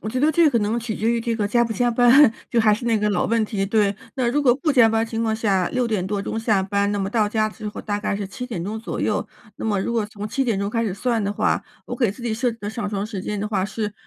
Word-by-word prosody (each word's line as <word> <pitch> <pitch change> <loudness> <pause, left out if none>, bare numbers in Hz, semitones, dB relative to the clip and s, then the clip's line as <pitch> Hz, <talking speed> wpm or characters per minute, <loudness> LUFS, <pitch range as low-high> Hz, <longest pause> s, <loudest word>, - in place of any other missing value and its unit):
我 215 - -5
觉 255 +3 -2
得 300 +3 +4
这 330 +1 +4
可 240 -5 +2
能 215 +3 0
取 225 -1 -4
决 220 +3 0
于 235 0 +1
这 230 0 -1
个 210 -2 -1
加 235 +3 +3
不 230 - -3
加 240 +3 +1
班， 245 +2 +6 0.2
就 235 - +2
还 220 -1 +4
是 225 +4 -2
那 230 -2 +2
个 210 0 +1
老 180 - +1
问 230 0 +1
题。 205 -3 -2
对， 205 -1 +1 0.2
那 250 -3 0
如 295 +3 +1
果 250 -4 +4
不 295 +4 -1
加 250 -4 +6
班 225 0 +1
情 230 0 -3
况 220 -1 +1
下， 195 -5 +1
6 250 -2 0
点 200 -5 -1
多 200 0 -2
钟 225 - -3
下 215 -4 +1
班， 200 +1 0
那 205 - -1
么 195 0 -2
到 215 -2 +2
家 215 0 +1
之 215 0 -7
后， - - -7
大 205 -1 -2
概 205 -1 -2
是 200 -1 -4
7 250 +6 -6
点 215 -9 -4
钟 215 +4 -4
左 - - -5
右。 - - 0 0.3
那 - - -6
么 205 -3 +1
如 235 - -2
果 225 -3 0
从 210 0 -7
7 270 +4 -1
点 230 -5 0
钟 200 +1 -2
开 230 +1 0
始 195 - -2
算 225 0 -1
的 200 - -1
话， - - 0 0.2
我 - - -5
给 235 -7 +1
自 240 - -13
己 235 -2 -1
设 235 +2 0
置 230 - -14
的 205 - -4
上 215 -2 -4
床 200 -1 -2
时 210 -3 -5
间 205 +1 -4
的 210 - -2
话， 195 -3 0
是 210 0 -3
220 Hz, 330 characters per minute, -22 LUFS, 205-235 Hz, 0.3 s, 班